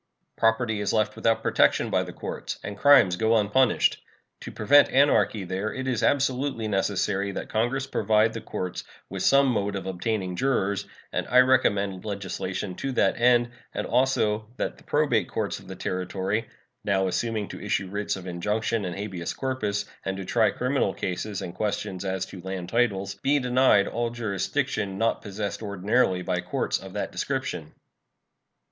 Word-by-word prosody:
Property 110 -1 +1
is 105 - -1
left 110 -1 +1
without 115 0 +1
protection - - +3
by - - +3
the - - -6
courts, - - -6
and 100 - -5
crimes 100 -6 +6
go 110 +2 +3
unpunished. 110 +4 +2 0.4
To - - -8
prevent 145 +7 +5
anarchy 110 -7 +3
there 95 +4 -3
it 130 0 -4
is 125 -3 0
absolutely 130 -4 +1
necessary 100 0 0
that - - -5
Congress 120 +5 0
provide 110 -4 +2
the 115 - -5
courts 90 -4 -5 0.3
with - - -4
some 140 0 +5
mode 100 -4 0
of 95 -2 -4
obtaining 95 0 -2
jurors, 100 -5 0 0.3
and - - -1
I 125 +1 +6
recommend 100 -7 +2
legislation 95 -2 -4
to 135 - -3
that 120 - +1
end, 120 0 +4 0.2
and - - -2
also 110 -5 +1
that - - -3
the - - -19
probate 125 - +1
courts - - -2
of - - -16
the - - -7
Territory, 95 +4 -2 0.4
now 95 -1 +1
assuming 110 +2 -1
to - - -8
issue 95 - -1
writs 100 +2 -2
of 95 -2 -9
injunction 105 +4 -1
and 90 -1 -4
habeas 95 -4 -4
corpus 105 -7 -2 0.2
and 95 0 -3
to 95 - -5
try - - +3
criminal 125 -6 0
cases 100 +2 -3
and 85 - -6
questions 95 -2 -3
as 95 -1 -2
to 95 - -10
land 95 -1 -5
titles, 100 -4 0
be 145 +2 +3
denied 125 -6 +4
all 120 +1 -1
jurisdiction 110 -1 -2
not 115 +2 +1
possessed 100 0 -4
ordinarily 100 -1 +1
by 90 -1 -1
courts - - -1
of - - -10
that - - -3
description. - - -3
105 Hz, 165 wpm, -26 LUFS, 95-120 Hz, 0.4 s, crimes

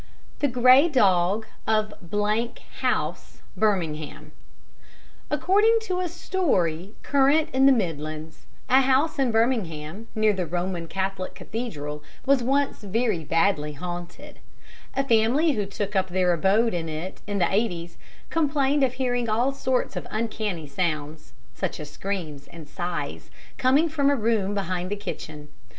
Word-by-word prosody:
The 290 - +2
Grey 255 +5 +6
Dog 200 - +3 0.2
of 215 -1 +1 0.9
House, - - -2
Birmingham 165 -8 -1 1.0
According 425 +4 +3
to 370 -4 -2
a 360 -1 -1
story 205 - -1
current 285 +3 +3
in 265 +1 +5
the - - +8
Midlands, 155 - -3 0.2
a 260 +1 +6
house 270 +4 +2
in 260 -3 +2
Birmingham, 215 -5 -1
near 215 -1 +3
the 185 -3 -2
Roman 175 0 -3
Catholic 190 +1 -3
Cathedral, 150 -11 -5 0.2
was 275 -1 +4
once 275 +2 0
very 210 -3 0
badly 165 -1 +1
haunted. 175 - -7 0.6
A 275 0 0
family 240 +8 +3
who 210 -7 -1
took 200 +1 -4
up 190 -1 +2
their 180 -1 +2
abode 200 +7 +2
in 165 -2 -2
it 160 +4 -6
in 205 -1 -2
the 190 - +1
'eighties 175 -6 -1 0.3
complained 285 -3 +2
of 255 -2 +2
hearing 245 -3 -1
all 240 +5 +2
sorts 260 -2 -1
of - - -5
uncanny 215 -6 -3
sounds 150 -1 -3 0.2
such - - -4
as 150 -1 -8
screams 160 -6 -5
and 165 -3 -11
sighs 175 +2 -4 0.3
coming 275 +6 +4
from 290 -3 +1
a 285 - +3
room 215 -4 0
behind 185 -2 -2
the 205 - -1
kitchen. 155 -7 -7
205 Hz, 140 wpm, -25 LUFS, 175-260 Hz, 1.0 s, the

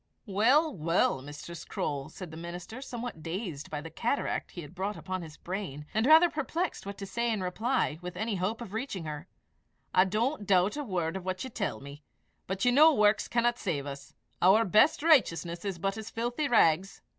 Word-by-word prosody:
"Well, 250 +9 +3
well, 165 -4 +1
Mistress 150 +4 -8
Croale," 140 -2 -3
said 180 -4 -9
the - - -9
minister, 175 +8 -7
somewhat 245 -9 -6
dazed 165 -3 -5
by 150 -1 -4
the 165 +1 -9
cataract 235 - -1
he 175 - -8
had 150 +1 -11
brought 195 +3 -3
upon 185 -1 -4
his 160 -2 -10
brain, 175 -6 -5
and 220 +3 +2
rather 320 +3 +8
perplexed 325 - -3
what 200 - -6
to 200 - -6
say 235 +4 -1
in 210 -4 -1
reply 215 - 0
with 180 0 -7
any 220 +3 -1
hope 205 +6 -2
of 215 -4 -8
reaching 220 -7 -4
her, 155 +2 -6 0.7
"I 185 - +6
don't 215 +3 -1
doubt 190 +3 +3
a 295 - -3
word 180 - -2
of 190 - -8
what 185 0 -3
you 260 - -7
tell 200 -9 -3
me; 140 +2 -10 0.5
but 190 +5 -2
you 245 - +5
know 305 +5 +7
works 210 -6 +3
cannot 240 0 +1
save 145 -7 -2
us; 140 -1 -8 0.3
our 205 +5 +6
best 215 - +4
righteousness 175 - +3
is 195 -3 -3
but 195 +3 -1
as 220 - -7
filthy 240 +6 -2
rags." 190 - +3
195 Hz, 200 wpm, -29 LUFS, 170-235 Hz, 0.7 s, rather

